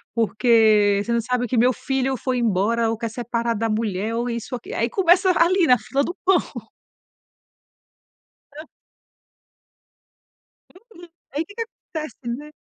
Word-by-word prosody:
porque 215 -3 +3
você 235 - -4
não 235 - +2
sabe 245 +2 -1
que 245 - -1
meu 250 +3 +4
filho 265 +1 -2
foi 255 +1 -2
embora 230 +1 +1
ou 225 - -2
quer 230 +1 -4
separar 235 0 -2
da 225 +1 -1
mulher 215 0 -2
ou 240 +1 -2
isso 235 +1 -4
aquil". 240 - -8
Aí 230 - 0
começa 370 - +3
a 340 - +4
ali, 370 0 +2
na 250 - +6
fila 275 +5 -1
do 345 - -4
pão. 380 0 +5 2.2
Pra 305 +2 -10 2.3
Uhum. 350 -1 -13 0.2
Aí 295 +4 -2
que 405 - -15
que 460 - -3
acontece, 315 -8 -8 0.2
né? 300 +1 -11
240 Hz, 150 wpm, -22 LUFS, 225-300 Hz, 2.3 s, na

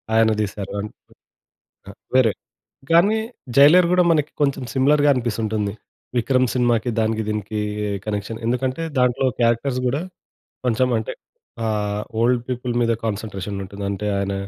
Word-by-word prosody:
ఆయన 110 0 +5
తీశారు. 100 -1 -4
ఆన్ 105 +1 -4 1.0
ఆ - - -7 0.2
వేరే 120 -5 +5 0.6
కానీ, 200 +7 +5 0.4
'జైలర్' 165 +6 +7
కూడా 180 0 +5
మనకి 150 -2 +1
కొంచెం 140 -2 +1
సిమిలర్‌గా 145 +2 +4
అనిపిస్తుంటుంది. 110 -4 -1 0.4
'విక్రమ్' 130 +2 +2
సినిమాకి, 120 -1 +2
దానికి 110 0 0
దీనికి 105 0 -2 0.4
కనెక్షన్. 105 +1 -3
ఎందుకంటే 130 +5 -1 0.2
దాంట్లో 125 +1 +2
క్యారెక్టర్స్ 120 +2 +1
కూడా 140 +6 0 0.7
కొంచెం 125 +2 +2
అంటే 110 - -4 0.5
ఆహ్, 105 -1 -1 0.2
ఓల్డ్ 120 0 +2
పీపుల్ 125 -1 -2
మీద 115 0 +2
కాన్సంట్రేషన్ 100 -2 -4
ఉంటుంది. 100 +1 -7
అంటే 100 +1 -3
ఆయన 100 0 -1
115 Hz, 130 wpm, -22 LUFS, 105-130 Hz, 1.0 s, జైలర్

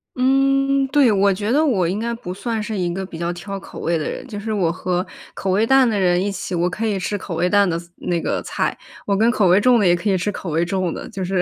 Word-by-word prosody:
嗯， 275 +1 +2
对。 270 -4 +4
我 200 0 +3
觉 205 +3 -2
得 295 +5 +3
我 200 - +2
应 195 +4 -2
该 235 +1 -2
不 180 -6 -7
算 225 +3 -3
是 215 0 -4
一 175 -2 -1
个 190 +1 -4
比 170 -3 -9
较 170 0 -1
挑 195 +3 -6
口 - - -11
味 170 0 0
的 155 - -3
人。 - - -6
就 210 -5 -6
是 220 +2 -4
我 180 -6 +1
和 180 +1 -2 0.3
口 190 - -2
味 205 +4 +3
淡 265 +1 +5
的 210 -3 0
人 180 0 +2
一 205 - -1
起， 185 -1 -4
我 175 +1 +1
可 215 +5 -3
以 205 - 0
吃 205 +3 -2
口 185 -3 -6
味 180 +2 +1
淡 200 -2 +4
的 165 - -1
菜 170 0 -15
那 175 -2 -2
个 - - -1
菜， - - -2 0.3
我 200 - +1
跟 220 +4 +3
口 210 -6 +2
味 180 +3 +5
重 245 +2 +4
的 205 - +2
也 175 -1 +5
可 175 +4 -2
以 190 - +2
吃 205 +4 -1
口 185 - -6
味 165 +2 +1
重 185 -1 -1
的， - - -7
就 195 -3 -5
是 185 0 0
195 Hz, 310 characters per minute, -20 LUFS, 180-225 Hz, 0.3 s, 淡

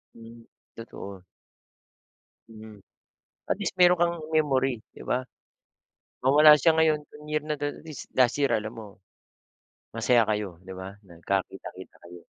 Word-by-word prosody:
Hmm, 115 0 -13 0.3
totoo. 100 -4 -9 1.3
'Yon 110 - -13
nga. 110 -1 -12 0.7
At - - +1
least 190 - -2
meron 180 0 +6
kang 170 0 +3 0.2
memory, 135 -6 +1
'di - - -12
ba. 125 - +2 1.1
Mawala 150 +3 +8
siya 165 +3 +4
ngayon, 160 -1 +3
'tong 150 0 -14
year 150 0 -1
na 150 -1 -2
'to, - - -2 0.2
at - - -20
least 155 -4 -9
last 125 -2 +4
year 140 - +2
alam 110 +1 -1
mo. 110 -2 -9 1.1
Masaya 115 +1 +3
kayo, 105 -5 -2
'di 95 - -9
ba, 95 +2 -8
nagkakita-kita 95 +1 -5
kayo. 85 0 -12
115 Hz, 145 wpm, -26 LUFS, 100-150 Hz, 1.3 s, Mawala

